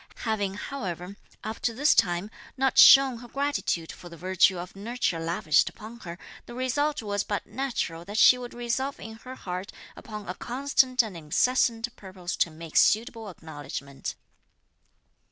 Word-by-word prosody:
Having, 205 -3 -1
however, 190 -6 -5 0.3
up 220 +1 -5
to 230 - -1
this 290 +5 +4
time, 175 +3 +1 0.3
not 265 -1 +2
shewn 270 -3 +8
her 245 - -11
gratitude 275 - -1
for 175 - -12
the 170 - -11
virtue 185 +1 +3
of 175 +2 -7
nurture 205 -4 -2
lavished 165 -2 +2
upon 230 +2 -11
her, 170 -5 -8 0.3
the 240 - -9
result 275 +2 0
was 205 -1 -1
but 205 - -3
natural 230 -11 -3
that 205 +3 -5
she 250 - +8
should 245 -1 -8
resolve 240 +3 -2
in 220 0 -9
her 255 +3 -10
heart 185 -3 -6 0.2
upon 210 -2 -9
a 180 - -3
constant 255 +2 +1
and 215 -5 -7
incessant 230 +8 +1
purpose 185 -3 -6
to - - +2
make 160 0 -6
suitable 225 -1 +3
acknowledgment. 145 -5 -7
215 Hz, 155 wpm, -27 LUFS, 180-250 Hz, 0.3 s, shewn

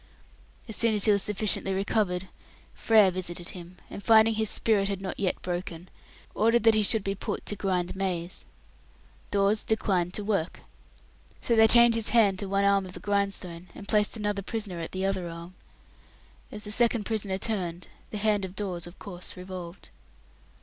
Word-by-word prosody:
As 220 - -2
soon 230 -2 +3
as 205 - +2
he 215 - +5
was 200 -1 +3
sufficiently 200 -1 0
recovered, 190 -2 0 0.5
Frere 215 -4 +4
visited 175 -1 -2
him, 180 0 -10
and - - -8
finding 225 0 +6
his 220 -1 +1
"spirit" 200 -3 +2
not 190 0 -6
yet 190 -2 0
"broken", 175 -1 -5 0.4
ordered 230 +1 +2
that 225 -1 +6
he 215 - +3
should 210 0 +1
be 195 - -1
put 195 - -5
to 205 - -2
grind 185 -3 -1
maize. 185 -2 -3 0.9
Dawes 200 +1 +2
declined 185 -5 0
to 210 - -2
work. 200 -5 -2 0.8
So 235 - 0
they 220 0 +7
chained 235 +1 +6
his 225 -2 0
hand 210 -4 +3
to 200 - -4
one 200 0 +1
arm 200 -1 +3
of 180 - -10
the - - -8
grindstone 195 -4 -2
and 200 - -10
placed 210 +1 +1
another 205 -1 -2
prisoner 205 -3 -4
at 165 - -5
the 190 +1 -2
other 190 -3 -1
arm. 170 +2 -9 1.0
As 210 0 -7
the 210 - -7
second 235 0 +2
prisoner 205 -4 -2
turned, 180 -5 -3 0.2
the 215 - -5
hand 210 -1 +1
of 190 0 -6
Dawes 180 -4 -4
of 175 - -13
course 180 -2 -7
revolved. 180 -1 -9
200 Hz, 175 wpm, -27 LUFS, 185-215 Hz, 1.0 s, they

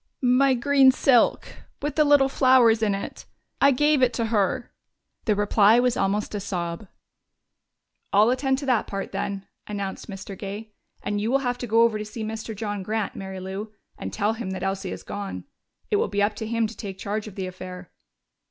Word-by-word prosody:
"My 255 +2 +4
green 270 +2 +5
silk 255 -2 +3 0.3
with 295 +1 -3
little 290 -2 +5
flowers 255 -4 +4
in 205 -3 +2
it. 195 - -7 0.4
I 280 - +7
gave 295 +1 +3
it 250 -1 +3
to 230 - -1
her." 205 +2 0 0.5
The 215 - +2
reply 205 +2 +4
was 245 -1 +2
almost 200 +2 -1
a 205 - -2
sob. 175 0 -4 1.2
"I'll 210 +4 +5
attend 265 +1 +1
to 280 - -5
that 250 -5 +1
part, 195 -1 -5
then," 195 -1 -3 0.2
announced 200 0 -5
Mr. 195 0 -7
Gay. 205 +3 -7 0.3
"And 205 0 -1
you 220 - -1
will 270 - +4
have 245 0 -1
to 245 - -4
go 230 +1 +4
over 225 -2 +2
to - - -3
see 215 +1 -6
Mr. 220 0 -5
John 205 -1 -3
Grant, 215 +2 -2
Mary 190 -1 -6
Lou, 195 +3 -6 0.2
and - - -6
tell 210 +1 0
him 225 -3 -5
that 185 -1 -5
Elsie 195 0 -2
has - - -7
gone. 200 -1 -6 0.5
It 415 - +4
will 440 - +1
be 205 0 0
up 210 +1 +1
to 220 - -4
him 230 0 +1
to 220 +1 -6
take 195 -3 -7
charge 210 +2 -3
of 205 - -10
the 190 - -3
affair." 185 -1 -8
215 Hz, 200 wpm, -25 LUFS, 200-245 Hz, 1.2 s, I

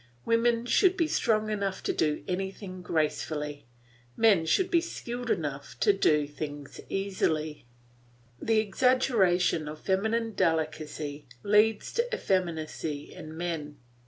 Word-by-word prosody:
Women 230 0 +2
should 375 +8 +4
be 330 - +2
strong 215 -7 +1
enough 200 -2 -2
to - - 0
do 150 -2 0
anything 190 0 -4
gracefully; 150 -4 -2 0.5
men 200 -8 +4
should 370 - +2
be 340 - +4
skilful 245 -8 -5
enough 140 -3 -3
to 205 - +5
do 195 - +3
anything 145 0 -6 0.2
easily. 160 -8 -1 0.7
The 225 -1 +2
exaggeration 200 - +2
of 150 +1 -7
feminine 220 +4 0
delicacy 155 -3 -1 0.2
leads 210 +1 +3
to 475 +1 0
effeminacy 160 - -2
in 155 +1 -9
men. 160 -4 -4
185 Hz, 120 wpm, -28 LUFS, 155-225 Hz, 0.7 s, to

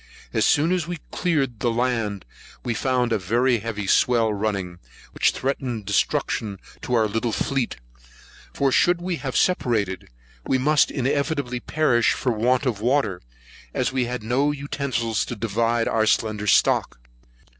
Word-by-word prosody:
As - - +2
soon 155 +4 +3
as 180 -4 0
we 175 0 -4
cleared 140 - 0
the 120 - +1
land, 115 -5 -1 0.4
we 120 - 0
found 125 0 0
a 110 - +1
very 120 +6 +2
heavy 105 -2 -4
swell 115 +1 +3
running, 100 -4 -3 0.3
which - - +2
threatened 130 -5 -3
destruction 105 0 0 0.2
to 125 - -1
our 110 -2 +3
little 115 +3 -1
fleet; 135 +1 -1 0.8
for 140 -1 +1
should 175 +6 +3
we 175 -1 -3
have 135 -4 -3
separated, 110 - 0 0.3
we 130 - +1
must 150 +4 +3
inevitably 140 -1 -1
perish 120 -4 +2
for 125 - -1
want 125 +5 +1
of 115 -6 -1
water, 120 -7 +1 0.5
as - - 0
we 130 -1 0
had 120 -2 -4
not 130 +6 +1
utensils 130 -6 -2
to - - -5
divide 115 +2 0
our 110 -1 +1
slender 105 -1 0
stock. - - +3
120 Hz, 150 wpm, -23 LUFS, 110-135 Hz, 0.8 s, soon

